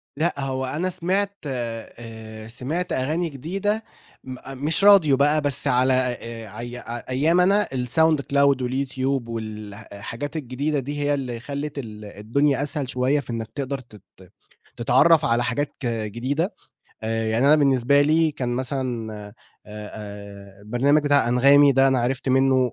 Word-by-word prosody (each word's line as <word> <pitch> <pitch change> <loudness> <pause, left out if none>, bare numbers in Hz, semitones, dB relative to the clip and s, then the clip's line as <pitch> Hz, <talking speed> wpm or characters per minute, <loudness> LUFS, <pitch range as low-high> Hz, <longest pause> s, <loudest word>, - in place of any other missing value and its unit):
لأ، 165 +4 0
هو 130 -1 -2
أنا 170 +8 -2
سمعت 190 +3 -1
آآ، 115 -3 -7
سمعت 150 +10 -3
أغاني 155 +6 -1
جديدة 195 - -2 0.4
م 130 -1 -7 0.3
مش 165 +5 +2
راديو 180 -10 +6
بقى 150 +2 +3
بس 145 -2 0
على 130 +1 +3
آآ، 115 -4 -3
أي 120 +1 -6 0.3
أيامي 160 +8 +3
أنا 200 +3 +3
sound 145 +5 +2
cloud 140 -1 +2
واليوتيوب 130 0 -2
والحاجات 110 +4 -7
الجديدة 145 +2 -2
دي، 145 +3 -5
هي 145 0 +1
اللي 125 -4 -3
خلّت 140 +3 -5
الدنيا 115 +5 -1
أسهل 145 -3 -2
شوية 130 +3 +1
في 135 - -9
إنَّك 115 -2 -4
تقدر 140 -1 -3
تت 110 -5 -16 0.8
تتعرف 155 +6 +4
على 120 +1 +2
حاجات 145 +3 -2
جديدة 120 - -2 0.5
آآ، 115 0 -1
يعني 115 +5 +2
أنا 150 +2 +6
بالنسبة 140 -1 +3
لي 155 +2 +3
كان 130 -4 -4
مثلًا 125 -3 -2
آآ 105 -1 -9 0.3
آآ 100 -2 -10
البرنامج 130 +8 +2
بتاع 145 -5 +3
أنغامي 140 +3 +6
ده 135 +1 +4
أنا 130 -2 +2
عرفت 125 +2 -1
منّه 130 -1 +3
130 Hz, 145 wpm, -23 LUFS, 115-145 Hz, 0.8 s, راديو